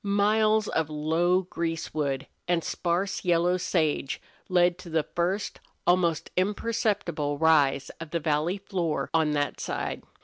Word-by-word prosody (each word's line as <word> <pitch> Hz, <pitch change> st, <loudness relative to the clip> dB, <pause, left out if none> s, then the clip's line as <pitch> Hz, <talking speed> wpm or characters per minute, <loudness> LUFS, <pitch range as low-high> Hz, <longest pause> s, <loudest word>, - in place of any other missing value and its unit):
Miles 215 Hz, +2 st, +3 dB
of 160 Hz, -1 st, 0 dB
low 165 Hz, +5 st, +1 dB
greasewood 160 Hz, -5 st, -2 dB, 0.2 s
and 175 Hz, -2 st, +1 dB
sparse 180 Hz, +3 st, -1 dB
yellow 175 Hz, 0 st, +3 dB
sage 155 Hz, -6 st, 0 dB, 0.3 s
led 175 Hz, -1 st, +3 dB
to 185 Hz, -, -10 dB
the 160 Hz, -1 st, +1 dB
first 180 Hz, +6 st, -2 dB, 0.3 s
almost 175 Hz, -3 st, +2 dB
imperceptible 200 Hz, -7 st, 0 dB
rise 145 Hz, -3 st, +3 dB
of 165 Hz, -1 st, -7 dB
the 170 Hz, -, -1 dB
valley 155 Hz, +4 st, 0 dB
floor 185 Hz, -5 st, -2 dB
on 160 Hz, -2 st, +3 dB
that 145 Hz, -1 st, -1 dB
side. -, -, -3 dB
170 Hz, 130 wpm, -27 LUFS, 155-185 Hz, 0.3 s, Miles